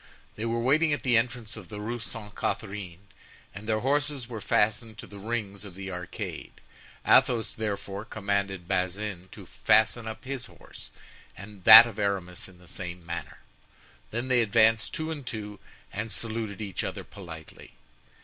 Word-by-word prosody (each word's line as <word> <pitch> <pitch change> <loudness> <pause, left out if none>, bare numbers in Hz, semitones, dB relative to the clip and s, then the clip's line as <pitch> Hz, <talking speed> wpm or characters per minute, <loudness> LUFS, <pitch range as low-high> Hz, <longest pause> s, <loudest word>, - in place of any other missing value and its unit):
They 110 - -4
were 115 0 0
waiting 150 +6 +3
at 145 - -2
the 125 -2 +3
entrance 115 -1 0
of 105 -5 -10
the 105 - -6
Rue 115 +3 -3
Sainte 110 -2 -7
Catharine, 100 -3 -4 0.5
and 105 +2 -9
their 110 -1 +1
horses 145 -1 0
were 115 -3 -6
fastened 110 +2 +1
to - - -8
the 100 - -11
rings 105 -2 -3
of 100 -4 -10
the 95 0 -6
arcade. 90 -1 -6 0.5
Athos, 125 -4 +4
therefore, 100 -2 -4
commanded 100 -4 -2
Bazin 95 0 -2
to - - -11
fasten 110 +1 +3
up 110 +5 -7
his 135 -2 -4
horse - - -14 0.5
and 100 -2 -11
that 115 +1 +13
of 115 -3 -7
Aramis 95 -3 -2
in 90 - -17
the 90 - -18
same 90 -1 -6
manner. 85 +1 -6 0.7
They 120 - -2
then 130 +1 -4
advanced 115 0 +4
two 160 0 -2
and 150 -3 -5
two, 105 -4 -6 0.3
and 105 +2 -3
saluted 110 -2 -3
each 100 -3 -3
other - - -4
politely. 85 -5 -11
105 Hz, 165 wpm, -28 LUFS, 100-115 Hz, 0.7 s, that